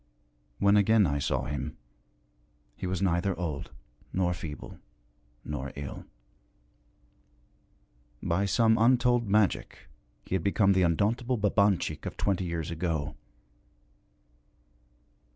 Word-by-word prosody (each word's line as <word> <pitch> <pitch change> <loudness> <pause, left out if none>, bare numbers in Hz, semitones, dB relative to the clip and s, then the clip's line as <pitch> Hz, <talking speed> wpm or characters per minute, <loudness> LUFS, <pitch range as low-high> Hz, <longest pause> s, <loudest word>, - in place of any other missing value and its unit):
When 100 +1 +4
again 105 +1 +5
I 70 -3 0
saw 65 -2 -1
him 75 0 -4 1.0
he 90 - -5
was 95 +1 -2
neither 90 0 +1
old 80 -5 -4 0.4
nor 90 -1 +1
feeble 80 -3 -8 0.7
nor 70 -2 -4
ill. 70 -1 -7 2.2
By 90 +4 +1
some 110 +2 +3
untold 120 0 +3
magic 105 -1 0 0.4
he - - -6
had 95 -4 0
become 100 0 +3
the 95 - +2
undauntable 110 +9 +1
Babanchik 100 -6 +1
of - - -6
twenty 95 -2 0
years 85 -2 -3
ago. 80 -3 -2
90 Hz, 105 wpm, -29 LUFS, 80-105 Hz, 2.2 s, again